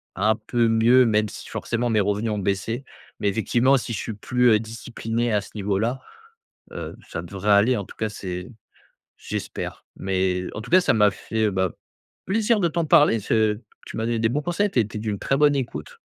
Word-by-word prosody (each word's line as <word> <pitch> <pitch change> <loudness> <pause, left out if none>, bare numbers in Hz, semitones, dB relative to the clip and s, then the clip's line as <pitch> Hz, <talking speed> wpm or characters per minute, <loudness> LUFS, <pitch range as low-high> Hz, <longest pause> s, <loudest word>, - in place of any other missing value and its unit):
un 105 +3 +2
peu 115 +2 0
mieux, 115 +3 +5
même 105 -1 +2
si - - -10
forcément 120 +1 -2
mes 110 -2 +2
revenus 105 +3 0
ont 105 - -1
baissé. 100 +6 -2 0.3
Mais - - 0
effectivement 120 +6 +3
si 120 -1 -4
je 105 - -2
suis 110 - -4
plus, 125 +4 +2
heu, 110 - +5
discipliné 115 +1 -3
à 105 - +2
ce - - -12
niveau-là, 105 +5 -1 0.7
heu, - - -6
ça - - -5
devrait 100 +1 -2
aller, 105 +5 +5
en 100 - -4
tout - - -13
cas 110 -1 -2
c'est 90 -2 -6 0.7
j'espère. - - -6
Mais 95 -1 0
en 105 - -5
tout 120 - -10
cas 185 - +7
ça - - +3
m'a 105 -2 +4
fait, 110 +2 -1
bah, 95 -1 0 0.5
plaisir 215 +2 +2
de 170 - +3
t'en 170 +1 -1
parler 145 -4 +6
et 110 - -3
ce 110 +1 +1 0.3
tu - - -8
m'as 110 - -1
donné 115 -1 0
des 110 0 +2
bons 145 +4 -1
conseils, 180 +5 0
tu - - -1
as 115 - +6
été 105 +1 -6
d'une 105 -2 -3
très 135 - 0
bonne 145 -1 +4
écoute. 115 - -5
110 Hz, 210 wpm, -24 LUFS, 105-125 Hz, 0.7 s, cas